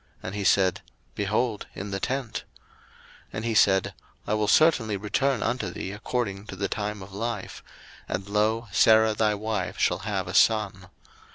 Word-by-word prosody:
And 95 - -5
he 105 -1 -3
said, 95 -1 +3 0.3
Behold, 105 +2 -1
in 100 +1 -6
the 95 - -2
tent. 130 0 -3 0.8
01:018:010 - - -36
And 110 - -4
he 115 - 0
said, 95 -3 +4 0.3
I - - -1
will 105 -1 +1
certainly 115 -8 +4
return 115 +6 0
unto 125 +1 -1
thee 95 - -5
according 105 -1 -3
to - - -7
the 100 +1 -2
time 105 -1 -4
of 95 0 -13
life; 110 -1 -4 0.5
and, 95 +1 -3
lo, 110 +3 +1
Sarah 110 +2 +5
thy 105 0 +1
wife 110 +1 -3
shall - - +1
have - - -3
a - - -5
son. 100 -5 +2
105 Hz, 170 wpm, -26 LUFS, 100-110 Hz, 0.8 s, Sarah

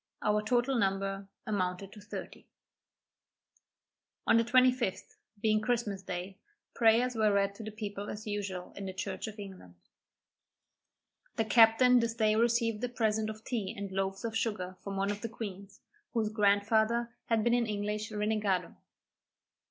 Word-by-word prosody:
Our 210 0 +2
total 240 +3 +1
number 195 0 -1 0.2
amounted 190 -2 -2
to 210 - -12
thirty. 205 - -8 1.8
On - - +5
the 230 - +4
25th, 250 -3 +2 0.2
being 215 0 +2
Christmas 220 -4 -1
day, 185 +1 -6 0.3
prayers 235 +2 +4
were 215 -2 +3
read 200 0 +2
to 220 - -9
the 215 - -5
people 205 -2 -6
as 210 +1 -6
usual 200 -4 -4
in 200 -1 -6
the 190 - -5
church 190 +2 -4
of 215 0 -8
England. 190 - -10 1.6
The 225 - +1
captain 235 +2 +6
this 230 -1 -1
day 215 -2 +3
received 230 -1 +2
a 250 - 0
present 220 -2 0
of 220 0 -8
tea 225 -4 -3
and 200 -1 -5
loaves 195 +2 -2
of 225 -1 -3
sugar 205 -5 -2
from 200 -1 -4
one 195 +1 +1
of 205 0 -5
the 230 - -3
queens, 200 -3 -8 0.3
whose 220 -2 +1
grandfather 220 +3 +2
had 225 -2 +2
been 235 +1 +3
an 240 -1 +2
English 210 0 -2
renegado. 210 -3 -1
215 Hz, 150 wpm, -31 LUFS, 200-230 Hz, 1.8 s, captain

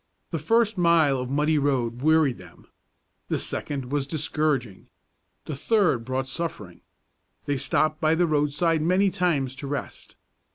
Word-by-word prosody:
The - - -2
first 225 -3 +1
mile 165 -6 +4
of 125 0 -4
muddy 150 +2 +1
road 125 -4 -1
wearied 155 -3 +3
them, - - -15 0.6
the - - 0
second 135 -3 -4
was 145 -2 -1
discouraging, 145 -8 -1 0.6
the 150 - -5
third 175 - +1
brought 130 +1 -2
suffering. 130 - -6 0.6
They 145 -1 -1
stopped 155 +3 0
by 155 +1 +3
the 175 +2 +2
roadside 155 +1 +1
many 185 +4 +2
times 165 -8 0
to 140 - -6
rest. 145 0 -6
150 Hz, 140 wpm, -25 LUFS, 135-165 Hz, 0.6 s, mile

